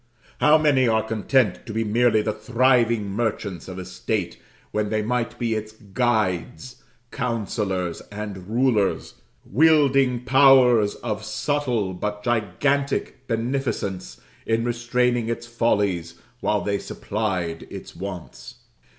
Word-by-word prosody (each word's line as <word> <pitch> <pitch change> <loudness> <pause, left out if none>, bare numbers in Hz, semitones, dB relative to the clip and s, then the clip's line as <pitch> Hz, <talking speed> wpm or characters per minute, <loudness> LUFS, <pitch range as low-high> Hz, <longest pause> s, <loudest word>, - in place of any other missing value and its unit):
How 150 +1 +6
many 145 -5 +3
are 110 -1 +2
content 110 -3 +1
to 110 - -5
be 110 +1 0
merely 110 0 +2
the 110 - -1
thriving 115 -1 +2
merchants 105 -4 -3
of 95 -1 -7
a 95 - -6
state, 95 -4 -3 0.3
when 105 -1 -1
they 110 0 0
might 120 +1 -2
be 115 -2 -1
its 110 0 -4
guides, 110 +3 -2 0.3
counsellors, 105 -8 -2
and 100 -3 -6
rulers 115 -4 +1 0.3
wielding 135 -2 +3
powers 130 -5 +5
of 110 -2 -4
subtle 120 -4 -1
but 105 +3 -4
gigantic 130 +5 -1
beneficence, 115 - -2 0.3
in 115 0 +1
restraining 120 0 0
its 115 0 -3
follies 100 -8 0 0.2
while 105 -3 0
they 100 -1 -1
supplied 95 -6 -3
its - - -9
wants. 90 -9 -8
110 Hz, 120 wpm, -23 LUFS, 100-125 Hz, 0.3 s, How